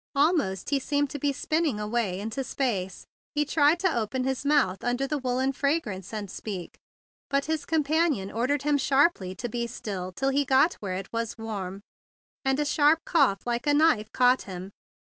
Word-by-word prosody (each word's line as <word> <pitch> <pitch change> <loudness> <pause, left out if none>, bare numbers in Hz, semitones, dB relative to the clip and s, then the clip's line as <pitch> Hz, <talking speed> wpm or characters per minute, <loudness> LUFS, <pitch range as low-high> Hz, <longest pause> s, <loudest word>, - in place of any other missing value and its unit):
Almost 280 - +1
he 280 - +3
seemed 285 +1 0
to 290 - -5
be 285 +1 +1
spinning 300 -3 0
away 210 -3 -1
into 225 +6 -3
space. 205 -9 -2 0.3
He 295 0 +2
tried 295 +2 +3
to 375 -5 +2
open 235 +3 -1
his 265 0 -2
mouth 280 -10 +2
under 245 +2 0
the 295 +1 -2
woollen 260 +1 0
fra¬ 280 +4 +1
grance 195 - -7
and 210 -4 -5
speak; 195 -5 -6 0.6
but 275 0 +1
his 315 -1 -2
companion 310 - +1
ordered 260 +5 0
him 295 -1 +2
sharply 270 - +2
to 240 - -4
be 235 +1 -3
still 195 -6 -5
till 270 +9 -1
he 280 +1 +2
got 275 +5 +4
where 190 -3 -3
it 195 +3 -7
was 230 0 -2
warm, 200 -4 -5 0.6
and 270 0 +1
a 295 - +1
sharp 295 +2 +4
cough 275 - +2
like 240 +3 -2
a 290 - +4
knife 270 -9 +3
caught 250 0 +4
him. 185 0 -8
260 Hz, 185 wpm, -27 LUFS, 210-290 Hz, 0.6 s, got